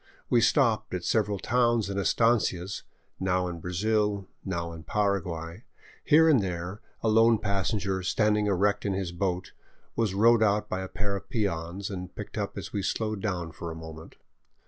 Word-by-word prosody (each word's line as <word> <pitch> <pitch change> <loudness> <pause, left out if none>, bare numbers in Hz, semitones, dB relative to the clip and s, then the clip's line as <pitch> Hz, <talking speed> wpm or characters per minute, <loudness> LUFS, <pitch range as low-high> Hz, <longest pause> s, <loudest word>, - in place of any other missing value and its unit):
We 120 - +5
stopped 115 -6 +2
at 90 - -4
several 105 -1 +1
towns 120 -1 +2
and 100 0 -2
estancias, 100 -3 +1 0.4
now 90 -1 +1
in 85 -1 -5
Brazil, 100 +2 0 0.2
now 85 -3 -3
in 80 - -9
Paraguay; 90 -2 -2 0.4
here 160 +2 +6
and 145 -8 +5
there 90 +2 -4 0.2
a - - +2
lone 115 +1 +5
passenger, 100 -1 -1
standing 105 +3 +2
erect 100 +1 +2
in 100 - 0
his 95 -2 -2
boat, 90 0 -2 0.4
was 110 -4 0
rowed 115 +3 +5
out 105 -1 +2
by 95 - -3
a 95 - -4
pair 100 +1 -3
of 100 0 -7
peons, 95 -4 -2
and 90 -2 -6
picked - - -7
up - - -3
as - - -6
we 100 - -1
slowed 110 0 -2
down 90 -6 -2
for 85 +2 -7
a 80 - -6
moment. 80 0 -10
100 Hz, 170 wpm, -28 LUFS, 90-110 Hz, 0.4 s, here